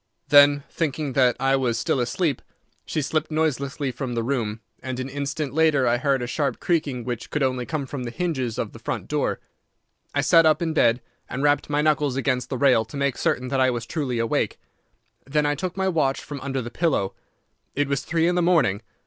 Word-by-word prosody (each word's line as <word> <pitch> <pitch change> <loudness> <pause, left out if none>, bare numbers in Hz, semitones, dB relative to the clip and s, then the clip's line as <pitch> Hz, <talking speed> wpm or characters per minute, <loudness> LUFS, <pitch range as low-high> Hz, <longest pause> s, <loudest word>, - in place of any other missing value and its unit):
Then, 145 0 +7
thinking 150 -3 -2
that 125 -2 +4
I 135 0 +3
was 125 -4 0
still 125 - 0
asleep, 135 +4 0 0.5
she 155 - -1
slipped 155 +3 -1
noiselessly 145 -3 -1
from 125 0 -4
the 115 - 0
room, 115 -4 -2 0.2
and 130 -1 -4
an 130 - -3
instant 140 +1 -3
later 155 -4 +3
I 120 - +3
heard 135 -2 +1
a - - -1
sharp 140 +3 -1
creaking 145 -8 0
which 120 -1 -5
could 150 - -1
only 130 -2 -1
come 155 -3 -2
from 135 0 -6
the 120 - -4
hinges 130 -7 -2
of - - -2
the - - -12
front - - -4
door. - - -1 0.8
I - - +3
sat 165 - +6
up 155 -1 +4
in 165 -2 -1
bed 120 -5 +3 0.3
and 135 +3 -3
rapped 145 0 +2
my 145 0 +1
knuckles 150 -3 +2
against 130 -2 -1
the 130 - -2
rail 125 -4 +4
to 140 - -9
make 140 -2 0
certain 125 0 -1
that 135 0 +1
I 130 - +4
was 120 -2 -3
truly 130 -3 -2
awake. 115 -1 0 0.7
Then 150 +2 +1
I 145 - +2
took 180 +5 -4
my 190 0 +1
watch 155 -7 +1
from 140 -2 -7
under 135 -2 -3
the 120 - -7
pillow. 135 - 0 0.6
It 145 0 +1
was 140 -2 0
three 165 0 +1
in 175 - +2
the 180 - +2
morning. 160 - +3
140 Hz, 215 wpm, -24 LUFS, 125-150 Hz, 0.8 s, Then